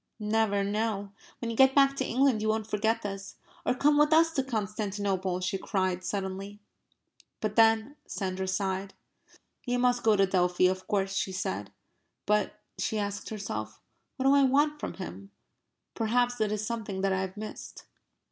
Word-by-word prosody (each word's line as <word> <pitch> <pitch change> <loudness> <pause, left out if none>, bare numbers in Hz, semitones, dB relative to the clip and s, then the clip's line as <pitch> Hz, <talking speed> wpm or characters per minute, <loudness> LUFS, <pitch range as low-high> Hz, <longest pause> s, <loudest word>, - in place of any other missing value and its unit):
"Never 210 -1 +1
no. 205 -1 -1 0.3
When 230 -1 -4
you - - -4
get 265 +2 +5
back 275 -1 +5
to - - 0
England 255 -2 +2
you 215 - 0
won't 220 0 0
forget 220 +1 0
this 195 -1 -6 0.3
or - - +3
come 290 +3 +3
with 295 +1 +4
us 325 +1 +5
to 275 -4 0
Constantinople!" 200 -5 -2
she 190 +1 -1
cried 185 -3 -1
suddenly. 195 +1 -4 0.8
"But 215 -1 -2
then..." 225 +4 +4
Sandra 190 -1 -3
sighed. 190 0 -2 0.7
"You 245 -1 0
must 245 0 +2
go 220 -1 +4
to 195 -1 +4
Delphi, 180 -1 +2
of 185 0 -4
course," 195 -1 0
she 195 0 -1
said. 105 - -3 0.5
"But," 210 -1 +1 0.2
she 215 +3 -1
asked 200 -1 -3
herself, 110 - -5 0.4
"what 265 - -2
do 270 - +6
I 280 - +6
want 290 +3 +3
from - - -5
him? 100 - -8 0.6
Perhaps 245 +1 +1
it 210 -1 +1
is 215 0 -2
something 210 -4 -4
that 195 -1 +2
I 190 - 0
have 190 +1 -5
missed...." 215 0 -8
210 Hz, 170 wpm, -29 LUFS, 190-235 Hz, 0.8 s, do